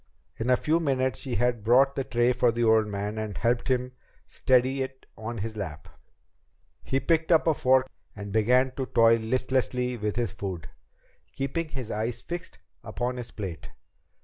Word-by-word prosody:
In 115 +3 -2
a 125 - +6
few 155 +5 +1
minutes 130 -6 0
she 130 -3 -4
had 120 0 0
brought 130 +5 +4
the 135 - -1
tray 120 -1 +2
for 120 -1 +3
the 120 +1 -1
old 110 -1 +4
man 105 +1 -3
and 105 -3 -4
helped 120 +3 0
him 125 -1 0 0.3
steady 130 +1 +2
it 130 0 -6
on 115 +1 -6
his 110 +2 -4
lap. 80 -8 -6 1.0
He 135 - 0
picked 160 +4 +1
up 165 - +5
a 160 - +4
fork 130 -2 +3 0.3
and 100 -1 -7
began 125 +4 +3
to 130 -2 -2
toy 115 -1 +5
listlessly 125 +1 -1
with 105 -1 -2
his 120 -4 -1
food, 95 -5 -6 0.7
keeping 145 +4 -3
his 130 -6 -6
eyes 110 +3 -2
fixed 175 0 -7 0.3
upon 125 +1 -3
his 120 -2 -6
plate. 90 -7 -7
120 Hz, 175 wpm, -27 LUFS, 110-130 Hz, 1.0 s, a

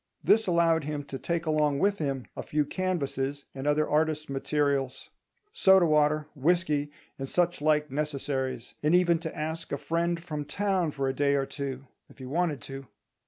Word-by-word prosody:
This 220 -1 +4
allowed 165 -3 +3
him 150 -1 -3
to 135 -1 -7
take 170 +3 -2
along 150 -2 +2
with 200 +6 +1
him 135 -4 -2
a - - -4
few 150 -1 0
canvases 140 -6 -2
and 135 +1 -5
other 150 +1 +2
artists' 155 0 0
materials; 140 -1 -1 0.4
soda 190 - +5
water, 150 -1 +3
whisky, 150 -1 +1 0.3
and 135 0 -4
such 175 -3 +1
like 150 -1 +2
necessaries; 135 -4 -3
and 150 +3 +3
even 175 -2 +4
to 160 -1 -6
ask 160 +2 -4
a 140 - 0
friend 170 +3 -1
from 150 -4 -4
town 190 -2 0
for 140 -2 -2
a 135 - 0
day 140 +1 +2
or 135 -1 +1
two, 135 -2 -5 0.2
if - - -18
he 130 - -8
wanted 155 +2 -1
to. 135 -1 -8
150 Hz, 175 wpm, -28 LUFS, 140-170 Hz, 0.4 s, soda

